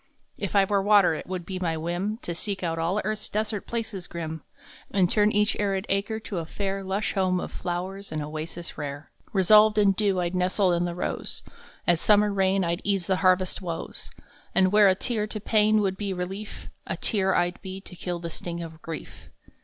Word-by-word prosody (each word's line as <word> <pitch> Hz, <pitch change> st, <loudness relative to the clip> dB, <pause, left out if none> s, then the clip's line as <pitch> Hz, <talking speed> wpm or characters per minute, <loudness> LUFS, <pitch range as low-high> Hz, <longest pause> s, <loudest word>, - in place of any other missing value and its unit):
If 200 Hz, 0 st, -3 dB
I 200 Hz, -1 st, +6 dB
were 200 Hz, 0 st, +1 dB
water 200 Hz, -3 st, +5 dB
it 155 Hz, -, -6 dB
would 185 Hz, -2 st, -4 dB
be 185 Hz, 0 st, -4 dB
my 165 Hz, -3 st, -1 dB
whim 175 Hz, +6 st, -2 dB
To 170 Hz, -, -3 dB
seek 195 Hz, +2 st, -3 dB
out 165 Hz, -1 st, -1 dB
all 170 Hz, +5 st, +1 dB
earth 215 Hz, 0 st, -1 dB
s -, -, -6 dB
desert 210 Hz, -1 st, -2 dB
places 220 Hz, -6 st, -4 dB
grim, 160 Hz, -2 st, -5 dB, 0.5 s
And 190 Hz, -2 st, +3 dB
turn 210 Hz, 0 st, +4 dB
each 210 Hz, +1 st, +2 dB
arid 195 Hz, -1 st, 0 dB
acre 200 Hz, +3 st, 0 dB
to 200 Hz, -4 st, -4 dB
a 165 Hz, -, -4 dB
fair 195 Hz, +2 st, -3 dB
Lush 195 Hz, +2 st, -1 dB
home 185 Hz, -2 st, +1 dB
of -, -, -5 dB
flowers 185 Hz, +3 st, -4 dB
and 155 Hz, -, -2 dB
oasis 155 Hz, +3 st, -6 dB
rare. 145 Hz, 0 st, -6 dB
[ -, -, -46 dB
16] -, -, -28 dB
Resolved 215 Hz, +3 st, +6 dB
in 205 Hz, -2 st, +5 dB
dew, 195 Hz, -1 st, +1 dB
I 175 Hz, -1 st, 0 dB
d 180 Hz, -, -3 dB
nestle 185 Hz, +1 st, +2 dB
in 175 Hz, 0 st, +1 dB
the 175 Hz, -1 st, -3 dB
rose. 180 Hz, -, -3 dB, 0.4 s
As 175 Hz, -1 st, +3 dB
summer 210 Hz, -1 st, +4 dB
rain 195 Hz, 0 st, +2 dB
I 170 Hz, 0 st, 0 dB
d -, -, -14 dB
ease 195 Hz, -3 st, +1 dB
the 190 Hz, -1 st, +1 dB
harvest 185 Hz, 0 st, +2 dB
woes, 170 Hz, -3 st, -6 dB, 0.5 s
And 185 Hz, -1 st, +4 dB
where 210 Hz, -1 st, +7 dB
a 190 Hz, -, +5 dB
tear 215 Hz, +1 st, -1 dB
to 215 Hz, -, -4 dB
pain 215 Hz, 0 st, +3 dB
would 190 Hz, -2 st, 0 dB
be 200 Hz, -1 st, -2 dB
relief, 190 Hz, +4 st, -6 dB, 0.2 s
A -, -, -2 dB
tear 190 Hz, -4 st, +2 dB
I 175 Hz, 0 st, +2 dB
d -, -, -20 dB
be 190 Hz, -1 st, -6 dB
to 185 Hz, -, -11 dB
kill 175 Hz, 0 st, -3 dB
the 170 Hz, -1 st, -6 dB
sting 170 Hz, +1 st, -5 dB
of 160 Hz, -1 st, -10 dB
grief. 165 Hz, -1 st, -8 dB
190 Hz, 225 wpm, -26 LUFS, 175-205 Hz, 0.5 s, where